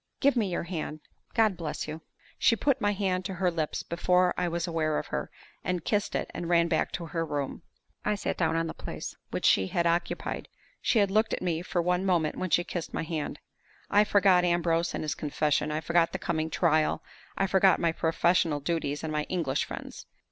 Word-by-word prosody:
Give 280 -1 +4
me 215 -5 +1
your 175 - -1
hand! 160 -3 -5 0.3
God 220 -4 +4
bless 165 -3 -4
you!" 155 +1 -6 0.4
She 230 - +5
put 275 +2 +1
my 205 0 +3
hand 190 -2 0
to 190 -1 -3
her 180 0 +1
lips 160 -3 -2
before 180 +1 +2
I 180 - 0
was 170 0 -1
aware 160 -3 0
of - - -2
her, - - -2 0.3
and 180 -2 -2
kissed 205 -2 0
it, - - -2
and 175 - -4
ran 170 -1 +4
back 165 -2 +1
into 170 - -5
her 165 +1 -2
room. 145 -2 -3 0.4
I 210 - +1
sat 200 - -2
down 165 -2 +1
on 165 0 +1
the 160 - -4
place - - -7
which - - -3
she 95 - +4
had 170 - 0
occupied. 170 +1 -1 0.3
She - - +2
had 200 -2 +3
looked 215 +2 +2
at - - -9
me 170 -2 0
for 175 -1 -1
one 180 +1 +1
moment 175 -5 +1
when 185 - -3
she 175 - +3
kissed 175 -1 -5
my - - -1
hand. 160 -2 -3 0.5
I 205 +1 +6
forgot 195 -3 +4
Ambrose 170 -1 +1
and - - -3
his 155 - -1
confession; 150 0 0
I 155 +1 -1
forgot 170 0 +2
the - - -1
coming 160 -1 -1
trial; 155 -1 +2 0.3
I 195 - +2
forgot 190 -1 +4
my 170 -1 +2
professional 165 -1 +2
duties 145 -1 -2
and 155 -1 -3
my 150 0 0
English 155 -7 0
friends. - - -8
170 Hz, 215 wpm, -28 LUFS, 160-185 Hz, 0.5 s, I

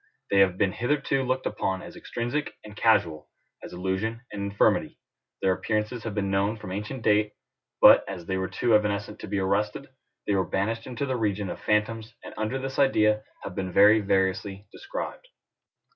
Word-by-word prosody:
They 100 - +4
have 95 -2 +4
been 100 -2 +2
hitherto 135 +4 0
looked 130 0 -1
upon 95 -1 -2
as - - -10
extrinsic 120 +6 -3
and 105 -1 -11
casual, 95 -10 +2 0.3
as - - -9
illusion 95 +6 -2
and 105 - -5
infirmity: 100 - +2 0.5
their 95 -1 +4
appearances 105 +5 -2
have 110 -2 -4
been 100 -2 -1
known 100 +3 +1
from 90 -4 -8
ancient 105 +6 -5
date; 105 0 +2 0.5
but, - - +9
as 90 -3 -6
they 95 - -2
were 95 0 -1
too 120 +4 0
evanescent 105 -1 +1
to - - -7
be 100 0 -2
arrested, 105 +7 -1 0.4
they 105 - 0
were 95 -1 +2
banished 110 +5 -2
into 130 +2 -3
the 130 -2 -1
region 105 -4 -1
of - - -7
phantoms, 110 +1 -1
and - - -9
under 110 +4 -2
this 135 +1 -4
idea 110 -6 +3 0.2
have 100 - -6
been 95 0 -4
very 105 +4 +6
variously 95 0 0
described. - - -6
105 Hz, 180 wpm, -26 LUFS, 95-115 Hz, 0.5 s, but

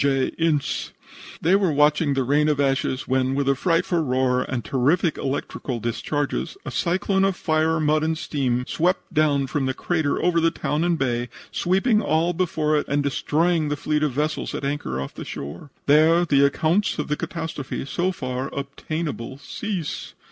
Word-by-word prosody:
J. 135 -2 +2
Ince. 160 -4 0 0.5
They 175 +4 +5
were 195 -4 +2
watching 150 0 +3
the 135 - +1
rain 145 +4 +2
of 150 -2 +1
ashes, 135 -1 0
when, 130 0 +1
with 140 0 0
a 140 - +5
frightful 170 +4 +1
roar 130 -2 +1
and 120 -4 -3
terrific 145 - +2
electric 135 +1 -3 0.2
discharges, 145 - -2
a - - -4
cyclone 190 +2 +1
of 195 -1 +2
fire, 160 -1 +1
mud 155 0 +2
and 160 +1 0
steam 125 -5 -1
swept 180 +5 -1
down 145 -3 +3
from 135 0 -1
the 130 - -1
crater 160 -5 0
over 175 -1 +2
the 165 - +4
town 155 -1 -1
and 175 -1 +2
bay, 120 -3 -1 0.2
sweeping 200 +5 +2
all 170 -2 +1
before 155 -3 0
it 150 - -1
and 145 +1 +1
destroying 155 +3 +1
the 150 - -1
fleet 150 +1 0
of 150 -2 +1
vessels 150 +4 -2
at - - -4
anchor 140 - -2
off 70 - -5
the - - -7
shore. 75 - -7 0.2
There 160 +4 +5
the 140 -3 +4
accounts 160 +8 +1
of 150 - -2
the 150 - 0
catastrophe 160 -6 -4
so 175 +6 0
far 130 -5 -4
obtainable 140 -2 -4
cease. 180 +3 -5
150 Hz, 175 wpm, -23 LUFS, 135-165 Hz, 0.5 s, They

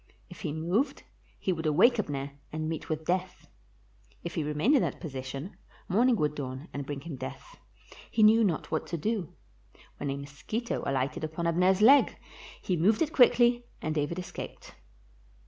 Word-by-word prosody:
If - - -11
he 165 -7 -2
moved, 180 - -1 0.3
he 190 - 0
would 160 -2 -3
awake 210 - +5
Abner 140 -7 -3 0.2
and 155 0 -3
meet 160 -1 -4
with 155 0 -3
death, 185 +1 -2 0.8
if 170 - -5
he 160 - -1
remained 150 - +2
in 265 - +4
that - - -2
position 135 +2 -6 0.3
morning 235 +6 +4
would 150 -7 0
dawn 135 +1 -6
and 140 -1 -5
bring 145 -1 -4
him 150 -2 -7
death; 135 - -8 0.5
he 220 - +2
knew 220 +2 +7
not 175 -7 -1
what 160 - -1
to 170 - -3
do, 200 0 -2 0.6
when 140 - -3
a 135 - -2
mosquito 145 +12 -4
alighted 135 +3 -1
upon 160 +2 -3
Abner 180 +3 +4
's 205 - 0
leg; 275 +5 +6 0.5
he 185 - 0
moved 210 - +3
it 310 - -4
quickly, 240 -1 +5
and 155 - -2
David 150 +2 -1
escaped. 180 - -7
170 Hz, 175 wpm, -29 LUFS, 145-215 Hz, 0.8 s, knew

